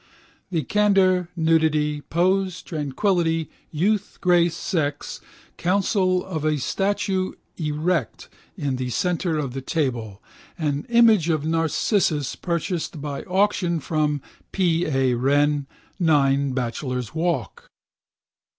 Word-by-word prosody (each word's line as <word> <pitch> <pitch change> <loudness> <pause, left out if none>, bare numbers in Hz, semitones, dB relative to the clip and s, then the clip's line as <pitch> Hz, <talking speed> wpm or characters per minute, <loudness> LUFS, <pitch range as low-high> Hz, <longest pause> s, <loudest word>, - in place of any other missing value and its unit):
The 165 -5 -1
candour, 190 -1 +3
nudity, 155 -3 +2
pose, 185 +4 0
tranquility, 165 +2 0 0.2
youth, 200 +6 0
grace, 175 -2 +3
sex, 145 -5 -2 0.4
counsel 185 0 +1
of 160 -5 -4
a 155 -1 +1
statue 190 +5 -1 0.2
erect 155 -3 -1 0.3
in 135 -3 -2
the 125 0 -3
centre 170 +5 0
of 140 -5 -3
the 135 - -4
table, 120 - -2 0.4
an 145 -4 -2
image 225 -8 +5
of 155 -2 0
Narcissus 160 - +1
purchased 170 -1 -3
by 145 -1 -4
auction 185 -3 +1
from 150 -2 -1 0.3
P. 175 -3 +1
A. 135 -3 +2
Wren, 145 +3 +2 0.3
9 140 -5 +3
Bachelor's 125 -2 -3
Walk. 165 - -2
160 Hz, 105 wpm, -23 LUFS, 145-180 Hz, 0.4 s, image